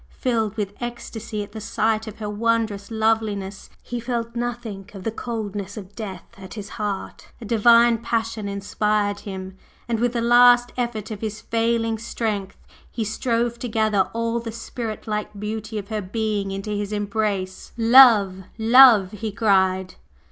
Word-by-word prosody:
Filled 225 -4 -1
with 205 -2 -2
ecstasy 230 -3 -5
at 205 - -12
the 220 0 -7
sight 220 +1 0
of 220 - -8
her 215 - -5
wondrous 215 -1 -1
loveliness, 220 -3 -1
he 245 - -4
felt 235 -1 -3
nothing 235 -5 -4
of 190 - -8
the 225 - -1
coldness 210 -3 -5
of 200 -1 -9
death 195 -6 -6 0.2
at 190 +2 -10
his 205 -2 -7
heart, 205 -3 -5
a 235 - -9
divine 230 +1 +5
passion 225 -2 -2
inspired 205 +1 -1
him, 190 -1 -8 0.3
and 230 -2 -1
with 240 +1 +1
the 235 - -1
last 245 +1 +6
effort 235 -4 -3
of 210 - -6
his 215 -1 -4
failing 230 0 0
strength 210 -4 -3 0.3
he 230 - -3
strove 235 +2 -1
to 245 - -4
gather 215 -3 +1
all 230 +1 -1
the 230 -1 -6
spirit 230 -1 -6
like 210 -2 -4
beauty 215 +1 -4
of 200 0 -6
her 215 -1 -2
being 205 0 -2
into 195 +2 -4
his 205 0 -3
embrace. 205 -2 -2
"Love 225 -6 +6
Love!" 225 -4 +7
he 215 +1 -5
cried. 190 -3 +2
220 Hz, 160 wpm, -23 LUFS, 205-230 Hz, 0.3 s, Love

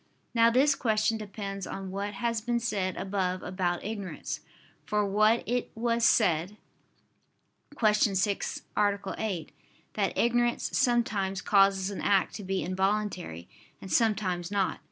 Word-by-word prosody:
Now 230 -1 +5
this 270 +5 +4
question 220 -3 +1
depends 200 -2 -6
on 195 -1 -6
what 200 +1 -4
has 230 +1 -1
been 240 +1 0
said 195 -5 -2
above 185 -2 -2
about 180 -2 -2
ignorance. 205 -3 -5 0.4
For 210 0 0 0.4
it 245 +1 -1
was 235 +1 0
said 185 -3 +3 1.2
(Q. 215 -2 +4 0.2
6, 200 +1 -1
A. 205 -1 +2 0.2
8) 185 -8 -3 0.4
that 200 -2 -1
ignorance 240 0 +1
sometimes 215 -7 +1
causes 195 -1 +3
an 200 - -5
act 195 -2 +2
to 210 - -7
be 190 0 -1
involuntary, 185 - -2 0.3
and 190 - -9
sometimes 195 -6 +1
not. 200 -2 0
205 Hz, 130 wpm, -29 LUFS, 190-225 Hz, 1.2 s, Now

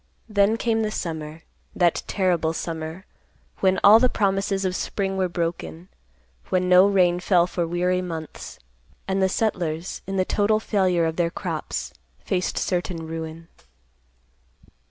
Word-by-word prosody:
Then 210 +1 +2
came 225 -1 0
the 215 - 0
summer; 160 -5 -5 0.3
that 175 -3 +2
terrible 175 -5 +1
summer, 165 +2 -5 0.5
when 190 -1 +2
all 210 +2 +9
the 255 +1 +3
promises 195 -2 0
of 185 -1 -1
spring 195 0 -2
were 190 -1 0
broken; 170 +1 -4 0.6
when 185 0 +1
no 180 +2 +7
rain 180 -3 +3
fell 180 -1 +3
for 175 -1 -2
weary 180 +2 0
months, 165 -3 -7 0.5
and 190 0 0
the 190 - +3
settlers, 180 -5 -2
in 195 0 -3
the 185 - +2
total 215 +2 +2
failure 185 -6 +1
of 160 0 -2
their 170 -1 +2
crops, 170 -3 -4 0.2
faced 180 -1 -2
certain 175 -2 -2
ruin. 160 0 -6
180 Hz, 140 wpm, -24 LUFS, 165-195 Hz, 0.6 s, all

